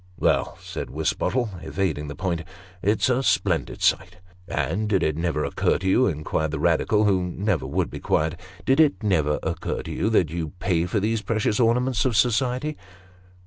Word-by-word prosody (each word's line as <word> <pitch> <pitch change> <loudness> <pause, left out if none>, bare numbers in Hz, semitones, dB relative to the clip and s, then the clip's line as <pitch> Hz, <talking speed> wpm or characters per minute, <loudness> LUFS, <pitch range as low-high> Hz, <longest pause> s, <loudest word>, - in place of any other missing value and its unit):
"Well," - - +1
said - - -6
Wisbottle, 115 -8 -1
evading 80 -6 -2
the 70 - -6
point, 90 -3 -2 0.4
"it's 105 +3 +2
a 130 0 +2
splendid - - 0
sight." - - +1 0.2
" - - -26
And 85 +10 -1
did 95 -3 +2
it 75 - +1
never 80 -2 -1
occur - - +1
to 95 - -4
you," 125 +7 +4
inquired 80 -1 -1
the 80 - -3
Eadical, 85 +7 +2
who 95 -3 +3
never 90 0 -1
would - - -1
be - - -6
quiet; 80 +2 0
" 95 - -20
did 135 +3 +3
it 150 -6 +3
never 80 -8 +2
occur - - -3
to - - -7
you, 110 - 0
that 90 -8 +2
you 80 -3 -4
pay 85 -3 +1
for 105 - 0
these 110 +2 0
precious 105 0 0
ornaments 120 0 +2
of 120 -5 +1
society 125 +5 +1
95 Hz, 185 wpm, -24 LUFS, 80-115 Hz, 0.4 s, you